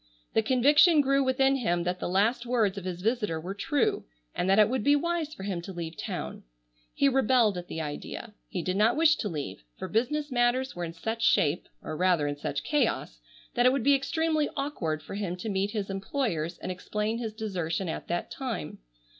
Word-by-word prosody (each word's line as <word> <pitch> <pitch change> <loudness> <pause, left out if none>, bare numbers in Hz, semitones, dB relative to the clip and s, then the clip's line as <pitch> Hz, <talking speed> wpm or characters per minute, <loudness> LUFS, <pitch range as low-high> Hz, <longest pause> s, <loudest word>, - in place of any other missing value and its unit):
The 220 - +4
conviction 290 - +5
grew 275 0 +3
within 270 +1 +3
him 175 -8 0
that 180 +1 -2
the - - -3
last 210 +6 +2
words 230 -5 +1
of 195 -2 -6
his 180 -1 -5
visitor 210 -7 0
were 180 +4 -5
true, 270 +7 0 0.3
and 180 - -1
that 195 - +5
it 210 -1 +7
would 255 -1 -1
be 285 +4 +5
wise 335 0 -1
for - - -9
him 190 -4 -2
to 185 - -8
leave 170 -2 -5
town. - - -5 0.5
He 280 - +4
rebelled 255 -5 +3
at 175 0 -6
the 160 - -4
idea. 155 +8 -6 0.2
He 180 -4 -3
did 185 +1 -1
not 220 +3 +4
wish 320 -1 +5
to 210 - -2
leave, 140 - -5
for - - -5
business 290 +7 0
matters 245 0 +1
were 175 0 -3
in 165 - -7
such 220 +7 -4
shape, 150 +2 +3 0.2
or 155 - -4
rather 180 -3 +2
in 145 0 -1
such 145 0 -3
chaos, 295 -1 0 0.3
that 245 0 +4
it - - +6
would 270 -3 0
be 285 - +5
extremely 310 +2 +1
awkward 170 - -2
for - - -8
him 195 -3 -2
to 200 +5 -5
meet 195 0 0
his 205 -2 -3
employers 195 - -2
and - - -5
explain 210 +5 -2
his 225 -2 -3
desertion 190 -5 -3
at 160 - -4
that 175 - -2
time. 250 - -4
210 Hz, 210 wpm, -28 LUFS, 180-260 Hz, 0.5 s, it